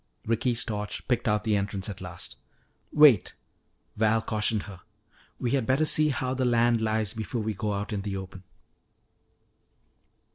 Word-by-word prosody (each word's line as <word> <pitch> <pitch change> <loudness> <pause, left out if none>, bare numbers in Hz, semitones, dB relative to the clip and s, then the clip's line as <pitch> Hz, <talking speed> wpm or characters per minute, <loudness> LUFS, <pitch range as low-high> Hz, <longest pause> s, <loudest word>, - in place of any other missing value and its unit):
Ricky's 115 +1 0
torch 105 -2 -4
picked 125 -2 0
out 105 0 +1
the 110 -2 +1
entrance 100 -1 -2
at 100 -3 -7
last. 90 -7 -7 0.6
"Wait," 150 -9 +5 0.6
Val 110 +1 +3
cautioned 110 -1 0
her, 95 -4 -10 0.6
"we 120 - -2
had 135 -5 0
better 135 +4 +3
see 155 0 +4
how 130 -1 -1
the 130 0 -1
land 120 -1 +3
lies 110 -2 0
before 110 +1 -4
we 110 0 -2
go 105 +1 -2
out 100 +2 -3
in 100 - -2
the 100 -1 -4
open." 95 0 -8
110 Hz, 155 wpm, -27 LUFS, 105-120 Hz, 0.6 s, Wait